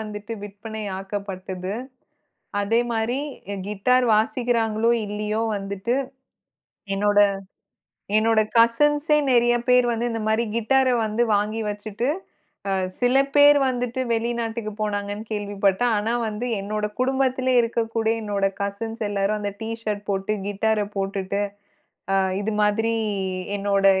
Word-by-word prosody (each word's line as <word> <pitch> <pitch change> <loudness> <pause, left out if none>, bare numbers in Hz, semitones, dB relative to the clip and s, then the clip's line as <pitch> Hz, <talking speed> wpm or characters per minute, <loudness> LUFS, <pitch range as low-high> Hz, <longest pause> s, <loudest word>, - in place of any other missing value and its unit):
வந்துட்டு 210 0 -6
விற்பனை 215 +2 -7 0.2
ஆக்கப்பட்டது. 190 -1 -5 0.9
அதே 225 +3 +2
மாரி 230 +3 0 0.5
கிட்டார் 250 +5 +2
வாசிக்கிறாங்களோ 225 0 +1 0.2
இல்லையோ 210 +1 -2
வந்துட்டு, 200 +3 -3 1.0
என்னோட 205 +1 +3 1.0
என்னோட 225 0 +3 0.2
கசின்ஸே 295 +6 +4
நிறைய 240 0 +4
பேர் 250 0 +6
வந்து 235 +1 -1
இந்த 225 -1 -3
மாரி 225 +2 +2
கிட்டார 260 +3 +3 0.2
வந்து 220 +3 +1
வாங்கி 210 +2 0
வச்சுட்டு, 210 +4 -3 0.6
அ 195 - +1 0.3
சில 245 +1 +3 0.2
பேர் 290 0 +8
வந்துட்டு 250 0 -2
வெளிநாட்டுக்கு 230 -1 -2
போனாங்கன்னு 205 0 -2
கேள்விப்பட்டேன், 205 +2 +1
ஆனா 220 +3 -1
வந்து 215 +3 -3
என்னோட 210 +1 -2 0.2
குடும்பத்திலேயே 260 -1 +2
இருக்கக்கூடிய 225 -1 -1
என்னோட 200 -1 +1 0.2
கசின்ஸ் 225 +3 -4
எல்லாரும் 205 +1 0
அந்த 205 -1 -3
டீ 220 - -4
ஷர்ட் 205 -2 -3
போட்டு 195 +2 -1
கிட்டார 210 +1 +1
போட்டுட்டு 195 0 -2 0.7
அ - - +4 0.2
இது 215 +2 -2
மாதிரி 215 +2 +2 0.7
என்னோட 200 0 +1
220 Hz, 115 wpm, -23 LUFS, 205-235 Hz, 1.0 s, பேர்